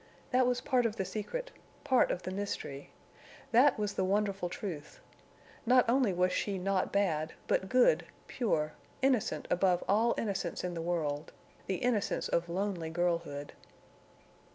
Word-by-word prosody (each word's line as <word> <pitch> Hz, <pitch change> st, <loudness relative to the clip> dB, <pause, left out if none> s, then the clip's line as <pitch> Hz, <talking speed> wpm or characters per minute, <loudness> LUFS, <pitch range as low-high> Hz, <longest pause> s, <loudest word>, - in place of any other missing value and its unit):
That 255 Hz, 0 st, +4 dB
was 245 Hz, 0 st, +1 dB
part 250 Hz, -2 st, +2 dB
of 220 Hz, -, -5 dB
the 190 Hz, -, -2 dB
secret—part 260 Hz, -, -1 dB
of 180 Hz, -, -2 dB
the 185 Hz, -, -4 dB
mystery. 190 Hz, -8 st, -4 dB, 0.6 s
That 250 Hz, +4 st, +5 dB
was 210 Hz, -1 st, -1 dB
the 190 Hz, -, 0 dB
wonderful 195 Hz, -1 st, 0 dB
truth. 170 Hz, -6 st, -6 dB, 0.6 s
Not 250 Hz, +1 st, +5 dB
only 245 Hz, -3 st, +3 dB
was 180 Hz, 0 st, +2 dB
she 200 Hz, 0 st, -1 dB
not 190 Hz, 0 st, 0 dB
bad, 165 Hz, -6 st, 0 dB
but 190 Hz, -, 0 dB
good, 255 Hz, -, +4 dB, 0.2 s
pure, 155 Hz, -11 st, -1 dB, 0.3 s
innocent 260 Hz, -5 st, +1 dB
above 180 Hz, -1 st, +2 dB
all 225 Hz, +4 st, +3 dB
innocence 195 Hz, -5 st, -2 dB
in 180 Hz, -1 st, -2 dB
the 165 Hz, -, -4 dB
world—the 165 Hz, +2 st, -4 dB
innocence 225 Hz, 0 st, 0 dB
of 170 Hz, 0 st, 0 dB
lonely 180 Hz, -2 st, -2 dB
girlhood. 165 Hz, -4 st, -2 dB
195 Hz, 140 wpm, -32 LUFS, 175-230 Hz, 0.6 s, That